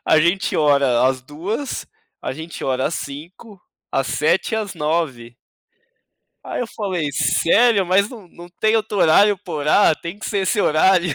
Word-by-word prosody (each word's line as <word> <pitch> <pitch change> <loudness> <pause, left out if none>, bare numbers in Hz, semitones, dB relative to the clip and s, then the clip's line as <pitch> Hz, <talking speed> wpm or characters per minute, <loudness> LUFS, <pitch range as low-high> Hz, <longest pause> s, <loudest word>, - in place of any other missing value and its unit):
a 160 - +4
gente 175 +4 +1
ora 140 -5 +3
às 130 -1 0
2, 180 - -5 0.4
a - - -3
gente 160 +3 -8
ora 130 0 0
às 165 - -3
5, 175 +8 -9 0.3
às 135 -1 0
7 155 +10 0
e - - +1
às 210 -4 -4
9." 150 -7 -2 1.1
Aí - - -4
eu 245 - -2
falei: 185 -10 -3
"Sério? 205 - +3
Mas 200 +3 +3
não 215 -7 -12
não 175 +1 -13
tem 220 +1 +3
outro 215 -2 -2
horário 200 +6 +5
pra 180 -4 -8
orar, 155 +3 +3
tem 170 +4 -7
que 215 - -7
ser 205 - -1
esse 205 +2 0
horário, 175 0 +3
170 Hz, 170 wpm, -20 LUFS, 150-205 Hz, 1.1 s, horário